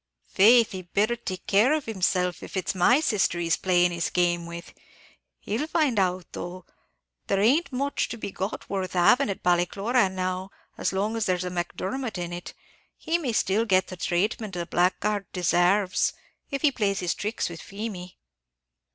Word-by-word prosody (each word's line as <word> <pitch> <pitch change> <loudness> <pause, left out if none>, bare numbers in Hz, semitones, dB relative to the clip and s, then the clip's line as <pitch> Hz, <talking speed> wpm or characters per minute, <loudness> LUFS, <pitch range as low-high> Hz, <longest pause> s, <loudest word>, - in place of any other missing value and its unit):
"Faith 230 +3 +6
he'd 185 -3 -8
better 215 +4 +2
take 190 -6 -6
care 215 +8 +4
of 310 -2 -1
himself, 180 -4 0
if - - -7
it's 190 +1 -1
my 195 +9 +4
sister 210 - +1
he's 170 -1 +1
playing 180 -1 +2
his 170 0 -2
game 175 -1 +1
with; 170 0 -9 0.7
he'll 235 +9 -2
find 295 -9 +1
out, 185 -1 0
though 175 0 -7 0.6
there 195 - +1
aint 275 +11 +3
much 275 +2 -1
to 235 - -5
be 205 - -5
got 195 +3 -5
worth 190 -2 -3
having 205 +9 +4
at 195 - -4
Ballycloran 190 +5 +2
now, 185 +1 -2 0.3
as - - -1
long 205 +4 -1
as 225 -2 -1
there's 180 -1 0
a 180 - -3
Macdermot 190 +7 -3
in 175 -1 -4
it, 175 0 -7 0.4
he 335 +2 -1
may 275 -7 -2
still 220 0 +1
get 190 -4 +2
the 185 - -6
traitment 190 +4 -1
a 170 - -2
blackguard 190 +3 0
desarves, 180 +2 +2 0.4
if 275 0 -4
he 300 - +5
plays 205 -6 0
his 180 -2 0
tricks 210 +3 -2
with 170 -1 -8
Feemy!" 195 -3 -7
190 Hz, 175 wpm, -26 LUFS, 180-225 Hz, 0.7 s, Faith